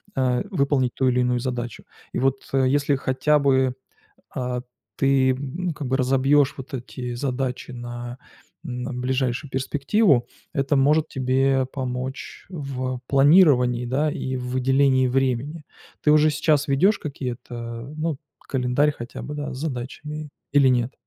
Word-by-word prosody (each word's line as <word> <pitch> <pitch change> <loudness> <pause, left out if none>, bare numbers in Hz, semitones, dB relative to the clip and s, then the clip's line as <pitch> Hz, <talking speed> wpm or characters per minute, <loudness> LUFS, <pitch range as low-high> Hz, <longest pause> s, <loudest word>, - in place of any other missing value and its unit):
а, 125 -2 +1
выполнить 140 -7 +1
ту 130 - +1
или 125 0 +2
иную 125 0 +1
задачу. 120 -2 -4 0.3
И - - -1
вот, 135 +1 +2 0.2
э, 135 -1 +3
если 140 +1 +2
хотя 135 +3 +2
бы, 130 -2 +2 0.6
а, 125 -1 -2 0.4
ты 135 -1 +3 0.4
как 145 -2 -5
бы 130 +1 +1
разобьешь 135 +2 +3
вот 135 +2 -9
эти 125 -1 -5
задачи 130 0 -3
на, 120 0 -7 0.5
м, 125 -2 -4
ближайшую 130 +2 -1
перспективу, 140 - +2 0.3
это 140 +1 +1
может 150 +3 +3
тебе 135 +1 +1
помочь 130 0 -5
в 130 -6 -4
планировании, 135 -5 +5
да, 145 +5 +1
и 130 -2 -3
в 125 0 -5
выделении 130 +1 +3
времени. 135 +4 -1 0.4
Ты 150 - +5
уже 155 0 +5
сейчас 150 0 +2
ведешь 165 +10 +3
какие-то, 120 -3 -6
ну, 155 -2 -1 0.2
календарь 130 +3 +1
хотя 120 -4 -8
бы, 150 - -6
да, 145 -1 -4
с - - -7
задачами 150 +2 -5 0.2
или 140 -2 +6
нет? 125 0 +1
130 Hz, 140 wpm, -23 LUFS, 125-145 Hz, 0.6 s, или